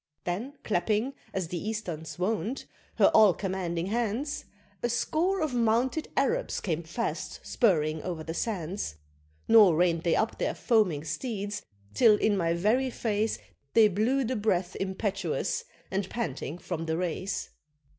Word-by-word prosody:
Then 210 Hz, +11 st, -3 dB
clapping, 215 Hz, +6 st, 0 dB, 0.2 s
as 185 Hz, -4 st, -3 dB
the 175 Hz, -, -3 dB
Easterns 185 Hz, -8 st, -4 dB
wont, 220 Hz, +7 st, -1 dB, 0.3 s
her -, -, +5 dB
all 215 Hz, -5 st, +7 dB
commanding 180 Hz, -3 st, -2 dB
hands, 235 Hz, +7 st, -2 dB, 0.4 s
A 240 Hz, -, 0 dB
score 345 Hz, +10 st, +1 dB
of 310 Hz, -4 st, 0 dB
mounted 240 Hz, +6 st, +1 dB
Arabs -, -, +1 dB
came 170 Hz, -4 st, -2 dB
fast 170 Hz, +8 st, -4 dB
spurring 155 Hz, -, +2 dB
o'er 170 Hz, -3 st, -4 dB
the 165 Hz, -, -5 dB
sands, 180 Hz, -, -3 dB, 0.5 s
Nor 210 Hz, -7 st, +7 dB
rein'd 170 Hz, 0 st, +2 dB
they 170 Hz, -1 st, +2 dB
up 220 Hz, -, 0 dB
their -, -, 0 dB
foaming 205 Hz, -, +2 dB
steeds 205 Hz, -, -3 dB, 0.3 s
till 215 Hz, -, +6 dB
in 210 Hz, -1 st, +2 dB
my 170 Hz, -3 st, +1 dB
very 225 Hz, +9 st, +2 dB
face 220 Hz, -2 st, -1 dB, 0.4 s
They 220 Hz, -2 st, +7 dB
blew 230 Hz, +8 st, +1 dB
the 255 Hz, +2 st, -1 dB
breath 190 Hz, -4 st, 0 dB
impetuous, 190 Hz, -4 st, -2 dB, 0.3 s
and 190 Hz, 0 st, -1 dB
panting 165 Hz, -, -3 dB
from 165 Hz, -2 st, -4 dB
the 160 Hz, 0 st, 0 dB
race. 180 Hz, +2 st, -3 dB
200 Hz, 145 wpm, -28 LUFS, 175-230 Hz, 0.5 s, all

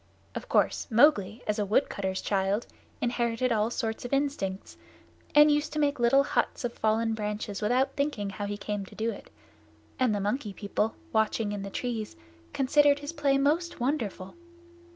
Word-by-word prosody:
Of -, -, -7 dB
course -, -, +2 dB
Mowgli, 225 Hz, -3 st, +4 dB
as 210 Hz, 0 st, -1 dB
a -, -, +2 dB
woodcutter's 190 Hz, -4 st, 0 dB
child, 195 Hz, +2 st, 0 dB, 0.4 s
inherited 240 Hz, 0 st, 0 dB
all 220 Hz, 0 st, +2 dB
sorts 225 Hz, -2 st, -3 dB
of 245 Hz, -, -6 dB
instincts, 275 Hz, -9 st, -2 dB, 0.6 s
and 295 Hz, 0 st, +8 dB
used 295 Hz, +1 st, 0 dB
to 305 Hz, -, -1 dB
make 285 Hz, -3 st, +1 dB
little 240 Hz, +4 st, +5 dB
huts 275 Hz, -, -1 dB
of 240 Hz, -, -3 dB
fallen 225 Hz, +1 st, +1 dB
branches 210 Hz, -1 st, -4 dB
without 255 Hz, +5 st, +1 dB
thinking 280 Hz, -9 st, -1 dB
how 205 Hz, 0 st, -4 dB
he 205 Hz, 0 st, -4 dB
came 205 Hz, -1 st, -3 dB
to -, -, -14 dB
do 225 Hz, +1 st, -1 dB
it. -, -, -11 dB, 0.7 s
The 225 Hz, -6 st, +2 dB
Monkey 210 Hz, +2 st, -2 dB
People, 210 Hz, +2 st, -2 dB, 0.2 s
watching 220 Hz, -1 st, +1 dB
in 205 Hz, -1 st, -4 dB
the 195 Hz, -, -5 dB
trees, 225 Hz, 0 st, -4 dB, 0.4 s
considered 285 Hz, +1 st, +4 dB
his 290 Hz, +2 st, -6 dB
play 280 Hz, -3 st, +2 dB
most 310 Hz, +5 st, 0 dB
wonderful. 230 Hz, -8 st, -2 dB
230 Hz, 165 wpm, -28 LUFS, 210-275 Hz, 0.7 s, and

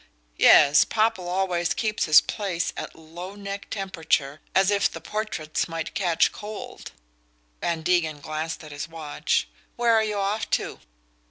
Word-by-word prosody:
"Yes. 145 Hz, -1 st, +7 dB
Popple 215 Hz, -5 st, 0 dB
always 180 Hz, -2 st, 0 dB
keeps 215 Hz, -2 st, 0 dB
his 155 Hz, -1 st, +8 dB
place 190 Hz, -5 st, -3 dB
at -, -, -6 dB
low 175 Hz, +4 st, -9 dB
neck 200 Hz, 0 st, -6 dB
temperature, 160 Hz, -7 st, -1 dB
as 190 Hz, +1 st, +4 dB
if 200 Hz, 0 st, +3 dB
the -, -, -8 dB
portraits 210 Hz, -8 st, -3 dB
might 165 Hz, -1 st, -5 dB
catch 180 Hz, -4 st, +2 dB
cold." 210 Hz, 0 st, -8 dB, 0.7 s
Van 165 Hz, -2 st, -1 dB
Degen 160 Hz, -4 st, +1 dB
glanced 155 Hz, +3 st, -4 dB
at 155 Hz, -, -10 dB
his 145 Hz, +1 st, -5 dB
watch. 155 Hz, -, -1 dB, 0.3 s
"Where 235 Hz, -1 st, +3 dB
are 220 Hz, -1 st, +4 dB
you 210 Hz, -1 st, -2 dB
off 200 Hz, +2 st, -1 dB
to?" -, -, -1 dB
180 Hz, 150 wpm, -25 LUFS, 160-205 Hz, 0.7 s, his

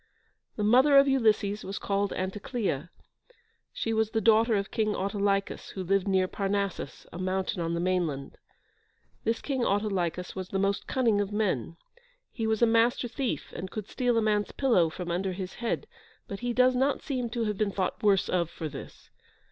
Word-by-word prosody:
The 210 Hz, -, -2 dB
mother 260 Hz, +7 st, +6 dB
of 275 Hz, 0 st, +7 dB
Ulysses 215 Hz, -5 st, +2 dB
was 195 Hz, +1 st, -5 dB
called 200 Hz, 0 st, -1 dB
Anticleia: 190 Hz, -, -3 dB, 0.8 s
she 225 Hz, -, -2 dB
was 220 Hz, -1 st, +1 dB
the 225 Hz, -, 0 dB
daughter 225 Hz, +1 st, +4 dB
of 200 Hz, -1 st, -2 dB
King 215 Hz, -1 st, 0 dB
Autolycus, 200 Hz, 0 st, -1 dB
who 190 Hz, -, -5 dB
lived 195 Hz, +2 st, +1 dB
near 190 Hz, -1 st, +2 dB
Parnassus, 195 Hz, -6 st, -3 dB
a 170 Hz, -, -6 dB
mountain 185 Hz, -1 st, -1 dB
on 165 Hz, 0 st, -1 dB
the -, -, -1 dB
mainland. 170 Hz, -7 st, -1 dB, 0.9 s
This 225 Hz, +1 st, 0 dB
King 265 Hz, -4 st, -1 dB
Autolycus 195 Hz, -5 st, -1 dB
was 185 Hz, -1 st, -5 dB
the 195 Hz, -, -1 dB
most 200 Hz, +1 st, 0 dB
cunning 230 Hz, -6 st, +2 dB
of 200 Hz, 0 st, -3 dB
men. 180 Hz, -, -1 dB, 0.5 s
He 225 Hz, -2 st, -2 dB
was 220 Hz, +1 st, +1 dB
a -, -, +9 dB
Master 230 Hz, +2 st, +3 dB
Thief, 240 Hz, -, -3 dB
and 185 Hz, +2 st, -5 dB
could 215 Hz, 0 st, -6 dB
steal 245 Hz, -2 st, 0 dB
a 225 Hz, -, +3 dB
man's 210 Hz, -1 st, +1 dB
pillow 230 Hz, -12 st, +3 dB
from 175 Hz, +2 st, -5 dB
under 185 Hz, +2 st, -1 dB
his 185 Hz, 0 st, -5 dB
head, 235 Hz, -, -1 dB, 0.4 s
but 200 Hz, -, -6 dB
he 245 Hz, 0 st, -2 dB
does 255 Hz, +1 st, +4 dB
not 270 Hz, +2 st, +1 dB
seem 255 Hz, -5 st, -2 dB
to 235 Hz, 0 st, -2 dB
have 210 Hz, -2 st, -2 dB
been 215 Hz, -2 st, +2 dB
thought 190 Hz, -2 st, -2 dB
worse 200 Hz, -3 st, +3 dB
of 170 Hz, -3 st, 0 dB
for 165 Hz, -1 st, -5 dB
this. 140 Hz, -2 st, -10 dB
205 Hz, 185 wpm, -28 LUFS, 185-230 Hz, 0.9 s, a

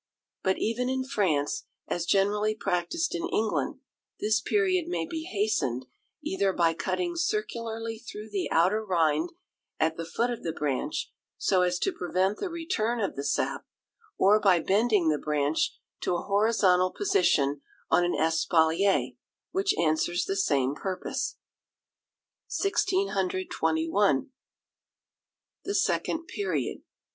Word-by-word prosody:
But 190 Hz, 0 st, +1 dB
even 245 Hz, +3 st, -1 dB
in 260 Hz, 0 st, 0 dB
France, 185 Hz, -, 0 dB, 0.2 s
as 175 Hz, 0 st, -2 dB
generally 210 Hz, +2 st, +2 dB
practised 220 Hz, -, -1 dB
in 345 Hz, 0 st, -2 dB
England, 220 Hz, -7 st, -1 dB, 0.4 s
this 215 Hz, +1 st, +2 dB
period 370 Hz, -, +1 dB
may 355 Hz, -, -1 dB
be 320 Hz, -2 st, -5 dB
hastened, 195 Hz, -, 0 dB, 0.4 s
either 195 Hz, 0 st, +1 dB
by 165 Hz, -2 st, +3 dB
cutting 345 Hz, -, -2 dB
circularly 230 Hz, -, -2 dB
through 220 Hz, -2 st, -9 dB
the 195 Hz, -2 st, -1 dB
outer 190 Hz, +7 st, +3 dB
rind 175 Hz, -, +1 dB, 0.5 s
at 160 Hz, 0 st, +1 dB
the 165 Hz, -, -4 dB
foot 235 Hz, +9 st, -1 dB
of 240 Hz, -, -5 dB
the 165 Hz, -, -3 dB
branch, 145 Hz, -3 st, -2 dB, 0.3 s
so 185 Hz, -2 st, +2 dB
as 180 Hz, 0 st, +2 dB
to 385 Hz, -, 0 dB
prevent 185 Hz, -, 0 dB
the 390 Hz, -, -2 dB
return 325 Hz, -, -1 dB
of 200 Hz, -, -1 dB
the 140 Hz, -, -4 dB
sap, 140 Hz, -, -1 dB, 0.5 s
or 205 Hz, +3 st, +5 dB
by 190 Hz, -4 st, +4 dB
bending 200 Hz, -1 st, +2 dB
the 150 Hz, -1 st, +1 dB
branch 150 Hz, 0 st, 0 dB, 0.2 s
to 180 Hz, -, 0 dB
a 175 Hz, -, -2 dB
horizontal 200 Hz, -3 st, +3 dB
position 180 Hz, -, +2 dB, 0.3 s
on 175 Hz, -, +5 dB
an 175 Hz, -, +1 dB
espalier, 165 Hz, +3 st, +2 dB, 0.4 s
which 390 Hz, +1 st, +1 dB
answers 170 Hz, +2 st, +1 dB
the 195 Hz, -, -2 dB
same 140 Hz, -8 st, +1 dB
purpose. 185 Hz, +4 st, -3 dB, 1.1 s
1621. 190 Hz, -, +1 dB, 1.3 s
The 400 Hz, -, -2 dB
Second 325 Hz, -4 st, 0 dB
Period. 405 Hz, +3 st, -2 dB
200 Hz, 130 wpm, -28 LUFS, 165-245 Hz, 1.3 s, or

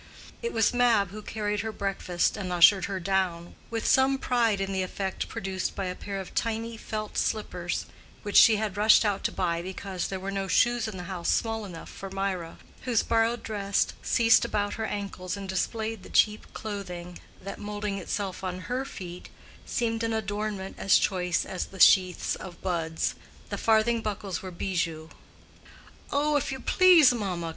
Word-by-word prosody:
It 470 Hz, -, -2 dB
was 225 Hz, +1 st, +2 dB
Mab 235 Hz, -6 st, +3 dB
who 215 Hz, +1 st, -7 dB
carried 210 Hz, -1 st, -2 dB
her 220 Hz, +1 st, -2 dB
breakfast 195 Hz, -4 st, -1 dB
and 190 Hz, -3 st, -4 dB
ushered 180 Hz, +1 st, +6 dB
her 195 Hz, -1 st, -3 dB
down—with 190 Hz, +4 st, -2 dB
some 265 Hz, +1 st, +4 dB
pride 235 Hz, -6 st, +1 dB
in 195 Hz, 0 st, -2 dB
the 190 Hz, -, 0 dB
effect 190 Hz, +1 st, -3 dB
produced 190 Hz, 0 st, -3 dB
by 195 Hz, -, -2 dB
a 180 Hz, -, -2 dB
pair 195 Hz, +1 st, -5 dB
of 190 Hz, -, -8 dB
tiny 230 Hz, 0 st, -2 dB
felt 215 Hz, -1 st, -4 dB
slippers 180 Hz, -5 st, -2 dB, 0.4 s
which 205 Hz, -, -5 dB
she 225 Hz, -, +8 dB
had 210 Hz, -2 st, -2 dB
rushed 215 Hz, +2 st, +6 dB
out 200 Hz, -2 st, 0 dB
to -, -, +1 dB
buy 170 Hz, -2 st, -1 dB
because 185 Hz, 0 st, -4 dB
there 190 Hz, -, -4 dB
were 195 Hz, +1 st, -4 dB
no 195 Hz, -1 st, -2 dB
shoes 240 Hz, +3 st, +2 dB
in 210 Hz, -3 st, -6 dB
the 180 Hz, -, -6 dB
house 175 Hz, -1 st, -3 dB
small 225 Hz, -1 st, 0 dB
enough 170 Hz, -4 st, -9 dB
for 195 Hz, -, -8 dB
Mirah, 190 Hz, -3 st, -3 dB, 0.2 s
whose 240 Hz, -4 st, +1 dB
borrowed 230 Hz, +1 st, +1 dB
dress 200 Hz, -2 st, 0 dB
ceased 230 Hz, -1 st, +4 dB
about 205 Hz, -1 st, -1 dB
her 220 Hz, -, -3 dB
ankles 200 Hz, -2 st, -4 dB
and 195 Hz, -1 st, -6 dB
displayed 220 Hz, +3 st, -2 dB
the -, -, -12 dB
cheap 210 Hz, 0 st, +2 dB
clothing 180 Hz, -4 st, -6 dB, 0.2 s
that, 195 Hz, +1 st, -7 dB
moulding 205 Hz, -1 st, -3 dB
itself 195 Hz, 0 st, -4 dB
on 185 Hz, 0 st, -3 dB
her 250 Hz, +7 st, -2 dB
feet, 180 Hz, -8 st, -8 dB, 0.4 s
seemed 230 Hz, -1 st, -1 dB
an 225 Hz, 0 st, 0 dB
adornment 205 Hz, -2 st, -3 dB
as 195 Hz, -, +5 dB
choice 180 Hz, -4 st, 0 dB
as 185 Hz, -, -4 dB
the 190 Hz, -, -12 dB
sheaths 185 Hz, -3 st, +5 dB
of 175 Hz, -2 st, -8 dB
buds. 165 Hz, -3 st, -1 dB, 0.4 s
The -, -, -3 dB
farthing 225 Hz, +1 st, +3 dB
buckles 200 Hz, -3 st, -4 dB
were 190 Hz, -, -6 dB
bijoux. 170 Hz, -3 st, -3 dB, 1.0 s
"Oh, 295 Hz, +1 st, +2 dB
if 275 Hz, -, -2 dB
you 265 Hz, -, -4 dB
please, 345 Hz, -5 st, +6 dB
mamma?" 185 Hz, -7 st, -3 dB
200 Hz, 175 wpm, -27 LUFS, 185-220 Hz, 1.0 s, she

